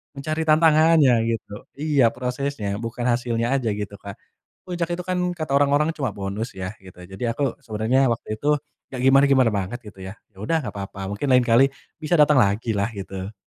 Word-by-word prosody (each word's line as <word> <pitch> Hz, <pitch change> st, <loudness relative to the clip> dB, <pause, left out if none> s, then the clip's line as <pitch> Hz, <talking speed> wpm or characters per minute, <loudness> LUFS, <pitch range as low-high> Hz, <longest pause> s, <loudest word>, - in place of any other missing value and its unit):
mencari 155 Hz, +3 st, -3 dB
tantangannya, 155 Hz, -2 st, +5 dB, 0.2 s
gitu. 115 Hz, -2 st, -3 dB, 0.2 s
Iya, 145 Hz, -2 st, +1 dB
prosesnya, 125 Hz, -3 st, -3 dB
bukan 120 Hz, +1 st, -4 dB
hasilnya 120 Hz, -1 st, 0 dB
aja, 120 Hz, -4 st, -2 dB
gitu, 105 Hz, -1 st, -6 dB
Kak. 100 Hz, -1 st, -9 dB, 0.5 s
Puncak 175 Hz, -1 st, -3 dB
itu 175 Hz, -, -3 dB
kan 185 Hz, -1 st, -1 dB, 0.2 s
kata 155 Hz, -4 st, -4 dB
orang-orang 145 Hz, +2 st, +2 dB
cuma 135 Hz, -3 st, -2 dB
bonus 100 Hz, +4 st, -4 dB
ya, 95 Hz, +2 st, -6 dB
gitu, 95 Hz, -1 st, -14 dB
jadi 95 Hz, +5 st, -9 dB
aku 140 Hz, -4 st, -1 dB
sebenernya 115 Hz, +5 st, +1 dB
waktu 110 Hz, -2 st, -6 dB
itu 145 Hz, -, -5 dB, 0.5 s
nggak 125 Hz, -, -4 dB
gimana-gimana 135 Hz, -2 st, +5 dB
banget 100 Hz, +5 st, -3 dB
gitu 100 Hz, -2 st, -13 dB
ya, 95 Hz, -, -7 dB, 0.2 s
yaudah 105 Hz, +12 st, -1 dB
nggak 105 Hz, -7 st, -7 dB
papa, 100 Hz, 0 st, -7 dB
mungkin 105 Hz, +8 st, -3 dB
lain 125 Hz, -, +6 dB
kali 120 Hz, +3 st, +5 dB, 0.4 s
bisa 155 Hz, +3 st, -2 dB
datang 150 Hz, -1 st, +5 dB
lagilah, 105 Hz, -1 st, +1 dB
gitu. 95 Hz, 0 st, -7 dB
125 Hz, 175 wpm, -23 LUFS, 105-145 Hz, 0.5 s, lain